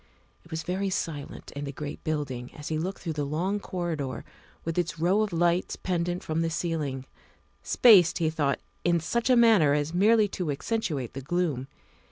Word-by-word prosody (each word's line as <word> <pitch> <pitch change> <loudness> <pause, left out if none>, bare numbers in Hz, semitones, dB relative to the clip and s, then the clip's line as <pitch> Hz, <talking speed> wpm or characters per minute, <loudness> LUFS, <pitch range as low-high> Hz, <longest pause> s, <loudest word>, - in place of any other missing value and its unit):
It 170 - -19
was 160 0 -4
very 190 +2 -1
silent 155 -6 -4
in 145 +1 -5
the 140 - -4
great 145 +1 -7
building 140 -6 -3
as 150 - -7
he 155 -1 -1
looked 185 +4 -4
through 165 - -2
the 150 -1 -2
long 175 +8 -1
corridor 160 - -4 0.4
with 165 +1 -1
its 175 -1 -2
row 180 +6 +2
of 215 -2 0
lights 175 +1 +1
pendent 175 -1 -2
from 160 +1 -1
the 165 - 0
ceiling, 155 -6 -2 0.6
spaced, 190 -9 +6
he 160 -2 +1
thought, 145 -3 0 0.2
in 170 -1 +3
such 235 +10 -1
a 255 - +6
manner 210 -12 +5
as 150 +2 -1
merely 210 +4 +4
to 180 -4 -3
accentuate 145 - -2
the 135 - -5
gloom. 145 -3 -1
165 Hz, 185 wpm, -27 LUFS, 145-180 Hz, 0.6 s, spaced